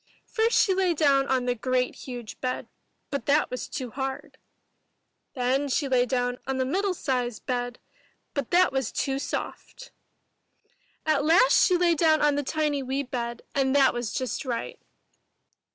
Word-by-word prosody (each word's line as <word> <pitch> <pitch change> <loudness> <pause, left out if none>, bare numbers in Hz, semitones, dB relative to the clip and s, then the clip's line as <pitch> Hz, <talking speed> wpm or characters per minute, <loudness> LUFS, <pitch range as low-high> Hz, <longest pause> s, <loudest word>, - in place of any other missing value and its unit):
First 455 0 +2
she 390 - +4
lay 370 -2 +1
down 280 -3 +3
on 255 -2 +1
the 245 - +1
great 250 +1 0
huge 245 -4 -8
bed, 255 0 -3 0.4
but 280 -5 -3
that 290 +2 +3
was 250 - -4
too 255 -4 -5
hard. 265 +1 -5 1.0
Then 265 +3 0
she 275 +2 0
lay 250 -2 +2
down 245 0 -1
on 270 -1 -1
the 260 - +1
middle 375 +7 0
sized 250 -6 -2
bed, 245 -1 -2 0.6
but 280 -4 -3
that 365 +1 +4
was 265 -4 -1
too 270 0 -1
soft. - - -6 1.1
At 305 -3 +2
last 345 +11 +5
she 365 - +4
lay 350 -1 +3
down 315 -1 +3
on 295 -1 +3
the 290 - 0
tiny 295 0 -1
wee 265 +2 -2
bed, 240 -2 -5
and 270 -1 +1
that 275 -2 +5
was 240 -3 -3
just 255 -1 -3
right. 245 -4 -4
270 Hz, 165 wpm, -26 LUFS, 250-305 Hz, 1.1 s, last